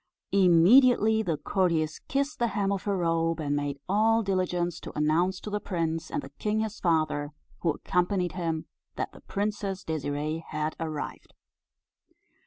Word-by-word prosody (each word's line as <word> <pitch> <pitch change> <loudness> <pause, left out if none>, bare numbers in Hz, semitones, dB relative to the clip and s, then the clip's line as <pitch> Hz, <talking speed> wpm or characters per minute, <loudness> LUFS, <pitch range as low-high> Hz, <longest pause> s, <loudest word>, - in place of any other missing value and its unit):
Immediately 215 +5 +6
the 170 -7 -1
courtiers 160 -1 0
kissed 280 +2 -1
the 240 - +2
hem 200 -2 0
of 195 -2 -2
her 200 -2 0
robe, 165 -1 +1
and 145 -2 -1
made 145 -1 -2
all 225 +3 +3
diligence 180 -3 -1
to - - -9
announce 170 +5 +2
to 210 - -6
the 210 - 0
prince, 165 -4 -2
and 290 - -3
the - - -10
king 215 +1 0
his 220 0 -4
father, 155 -3 0 0.3
who 170 - 0
accompanied 180 +3 0
him, 165 -3 -2 0.3
that - - -3
the - - -15
Princess 200 -2 -3
Désirée 155 0 -2
had 155 +1 -3
arrived. 155 -3 -5
180 Hz, 155 wpm, -28 LUFS, 160-205 Hz, 0.3 s, Immediately